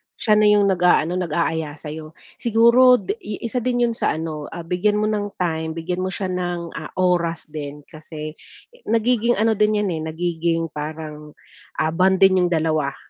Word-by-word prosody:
Siya 215 - -1
na 215 - +5
yong 210 0 +5
nag-a-ano, 180 -1 +2
nag-a-aya 160 -3 -1
sa'yo. 155 +1 -9 0.2
Siguro, 235 +2 +5
di 405 - -4 0.2
isa 235 +2 -2
din 245 0 0
'yon 230 - -2
sa - - +1
ano, 155 -2 -5 0.2
bigyan 205 +5 +1
mo 215 - +1
ng 205 -2 -2
time, 160 -2 -2
bigyan 175 +2 -3
mo - - -1
siya 190 -2 -3
ng, 175 -2 -3
ah, 155 - -6
oras 175 -3 0
din. 145 -1 -7
Kasi, 155 0 -8 0.6
nagiging 235 +1 +2
ano 220 +1 +2
din 210 0 +3
'yan, 165 -6 -2
nagiging 165 0 -1
parang, 150 0 -7 0.5
ah, 155 - +1
bonding 190 +2 +4
niyong 180 -1 +1
dalawa. 155 -3 0
175 Hz, 160 wpm, -21 LUFS, 160-210 Hz, 0.6 s, na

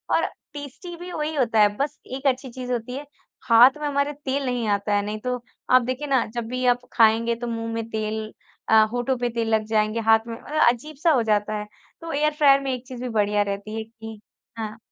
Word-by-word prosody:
और - - +2 0.3
टेस्टी 290 +5 -8
भी 355 +1 -8
वही 310 -1 -3
होता 235 -5 +2
है 210 - +7
बस 290 +2 -2 0.2
एक 270 +1 -2
अच्छी 260 0 0
चीज़ 250 0 -6
होती 240 0 -3
है 285 - -6 0.4
हाथ 245 +5 +7
में 295 - -1
हमारे 280 +1 0
तेल 280 -1 -3
नहीं 245 -3 -1
आता 205 0 0
है, 205 - +2
नहीं 210 +1 -4
तो 250 +1 -3 0.3
आप 255 0 +7
देखिए 255 +4 -3
ना 265 -4 +2
जब 235 -1 -3
भी 255 +2 -2
आप 245 - -13
खाएँगे 230 +1 +4
तो 240 +1 -5
मुँह 230 -1 -3
में 225 0 -4
तेल 220 0 -2 0.5
अ, 220 0 +7
होठों 245 +2 -1
पर 245 0 -1
तेल 225 -1 0
लग 215 0 -1
जाएँगे 215 +1 +1
हाथ 225 - +7
में 230 - -5
मतलब 305 -3 +2
अजीब 300 +5 -10
सा 335 - +5
हो 255 -6 +3
जाता 210 0 +1
है 210 - -6 0.3
तो 330 0 -6
एयर 300 +1 +1
फ्रायर 280 -2 +5
में 270 -1 -2
एक 250 0 -7
चीज़ 250 -1 -8
भी 250 - -3
बढ़िया 210 -2 +1
रहती 205 +1 -3
है 220 - -3
कि 225 -1 -11 0.4
हाँ। 220 -1 -5
240 Hz, 235 wpm, -24 LUFS, 220-275 Hz, 0.5 s, है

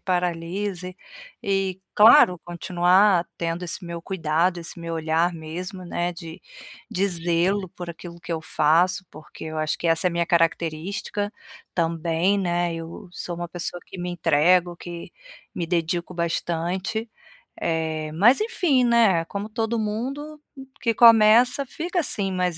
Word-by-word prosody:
paralise 180 +1 -2 0.5
e, 195 -1 -1
claro, 210 -4 +7
continuar 175 +2 +3
tendo 170 +1 -3
esse 175 +2 -4
meu 170 -1 -6
cuidado, 175 0 0
esse 170 0 -8
meu 165 0 -5
olhar 160 +2 +1
mesmo, 180 +4 -7
né, 175 0 -2
de 165 -1 -10 0.5
de 195 +2 +1
zelo 175 +3 0
por 175 0 -8
aquilo 170 +1 -11
que 170 0 -5
eu 160 - -2
faço, 165 +4 +2
porque 155 +1 -12
eu 155 0 -5
acho 155 -1 -1
que 170 - -3
essa 165 +2 +2
é - - +5
a - - -5
minha 170 0 0
característica, 170 +5 -1 0.4
também, 170 +3 +1
né. 175 -2 0
Eu 165 +3 -8
sou 175 - -5
uma 175 0 -5
pessoa 175 0 -5
que 185 - -11
me 180 0 -3
entrego, 175 +1 +2
que 170 -1 -8 0.4
me 170 - -3
dedico 170 +1 -1
bastante, 175 +6 -2 0.5
eh, 160 -2 -2
mas, 215 - +5
enfim, 350 - +2
né, 230 -7 +4
é - - -7
como 200 +4 -5
todo 225 +1 -2
mundo 270 +8 -4 0.4
que 230 - +1
começa, 230 +4 +6
fica 350 +7 -3
assim 200 - +1
mais 180 -2 -1
175 Hz, 150 wpm, -24 LUFS, 165-200 Hz, 0.5 s, claro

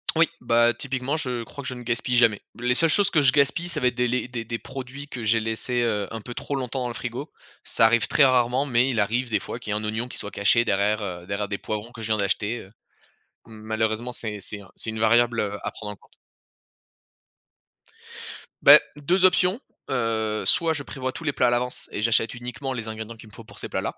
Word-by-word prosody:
Oui, 165 0 +5
bah, 120 0 +3
typiquement, 135 +2 -2
je 125 -6 -3
crois 140 - -9
que - - -6
je 130 - -3
ne 125 - -8
gaspille 120 +1 0
jamais. 115 -4 +4 0.2
Les 125 +1 +2
seules 165 +4 +5
choses 200 +5 +3
que 155 - +3
je 130 -2 +4
gaspille, 145 +5 +2
ça 170 - -3
va 125 - +4
être - - 0
des 125 0 +1
les 125 +1 -1
des 115 -2 -5
des 115 0 -4
produits 135 +2 -8
que 120 -3 -6
j'ai 115 +1 +3
laissés, 115 +2 -1
heu, 105 -4 0
un 115 -1 -5
peu 120 +3 -8
trop 140 - -4
longtemps 130 -1 -3
dans - - -2
le 120 - -5
frigo. 125 +5 -6 0.3
Ça 115 - +3
arrive 115 0 +3
très 145 - +4
rarement, 130 +1 +3
mais 125 -1 +3
il 115 -4 0
arrive 120 +5 0
des 110 -3 +1
fois 120 - -6
qu'il 105 -3 -6
y - - 0
ait - - -1
un 110 - -6
oignon 110 +3 -2
qui - - -8
soit 105 - -4
caché 110 +4 +3
derrière, 105 +1 +1
heu, 90 -3 -5
derrière 100 0 -3
des 100 - -1
poivrons 110 +2 -5
que 115 - -10
je 110 - -4
viens 110 - +1
d'acheter, 105 +3 0
heu. 95 - -13 0.7
Malheureusement, 110 +2 -2
c'est 110 -3 -5
c'est 100 +2 -5
un 100 - -16
c'est - - -3
une 110 -1 -3
variable, 115 +1 +3
heu, 105 0 -1
à - - -3
prendre 105 -1 -7
en - - -14
compte. - - -26 2.5
Bah, - - +10 0.2
2 180 +6 +2
options, 185 +4 +3 0.3
heu, 110 -4 0
soit 165 -2 +4
je 145 -2 -5
prévois 130 -2 -4
tous 165 - -9
les 145 -3 0
plats 125 - +2
à - - +4
l'avance 125 +1 -2
et - - -4
j'achète 115 0 +2
uniquement 125 +2 -5
les 115 -3 -5
ingrédients 110 +1 -6
qu'il 110 -1 -14
me 105 - -22
faut 115 - -10
pour - - -13
ces - - -6
plats-là, - - -3
120 Hz, 245 wpm, -24 LUFS, 110-130 Hz, 2.5 s, Bah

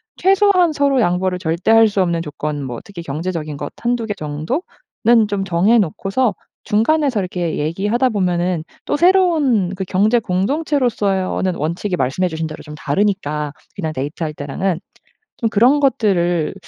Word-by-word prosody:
최소한 380 -3 +4
서로 280 -3 +2
양보를 180 0 +1
절대 170 +3 -2
할 225 0 +7
수 200 -1 0
없는 170 -2 0
조건 150 -2 -4
뭐 125 -3 -5
특히 195 -4 -9
경제적인 155 -1 -4
것 - - -6
1-2 240 -1 -1
개 210 - -2
정도는 210 - -1
좀 200 -1 -1
정해 195 +6 +3
놓고서 200 +5 0 0.3
중간에서 255 +2 +2
이렇게 180 -3 -2
얘기하다 205 - 0
보면은 180 -4 0 0.2
또 - - 0
새로운 315 - +3
그 190 - -3
경제 210 +6 +2
공동체로서의어는 200 - 0
원칙이 170 +5 -2
말씀해주신 160 +5 -1
대로 155 - -9
좀 150 0 -10
다르니까 150 -2 -1 0.2
그냥 160 -6 -3
데이트할 150 +3 -4
때랑은 160 +5 -2 0.6
좀 225 - 0
그런 245 +8 +4
것들을 190 - +1
190 Hz, 335 characters per minute, -19 LUFS, 165-235 Hz, 0.6 s, 할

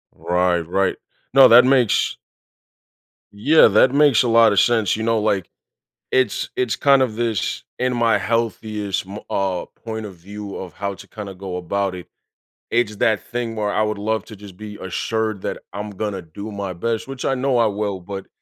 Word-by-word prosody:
Right, 90 0 +1
right. 95 +2 +1 0.4
No, 135 -1 +9
that 120 +2 +8
makes 130 -4 +2 1.2
Yeah, 140 +11 +5
that 125 +6 +4
makes 145 -5 +5
a - - 0
lot 115 -1 +6
of 100 - +3
sense. 115 -5 +2
You 110 - -4
know, 115 0 +2
like, 100 -4 0 0.6
it's 130 -5 +1
it's 125 -3 0
kind 140 -1 +4
of 120 -4 0
this 115 -3 -2 0.2
in 125 0 0
my 115 -3 +3
healthiest 110 -2 -2
m 100 +2 -7
uh, 95 -2 -1 0.2
point 110 -1 -4
of 100 -3 -9
view 100 +3 -9
of 95 -2 -8
how 100 0 -4
to - - -14
kinda 105 -2 -8
go 95 -1 -6
about 95 +2 -2
it. 90 - -9 0.6
It's 115 -3 +1
that 110 -1 +2
thing 120 -2 -4
where 105 -1 0
I 110 - +1
would 105 -1 -1
love 110 +1 -1
to 110 - -11
just 100 -2 -12
be 105 0 -8
assured 110 +2 -2
that - - -3 0.2
I'm 105 +2 -5
gonna 100 -1 -4
do 95 +6 -9
my 100 -2 -4
best, 115 +6 -2
which 135 -1 -6
I 135 - +1
know 130 0 +1
I 115 - +4
will, 100 -2 -2
but 95 +2 -7
105 Hz, 190 wpm, -21 LUFS, 100-115 Hz, 1.2 s, No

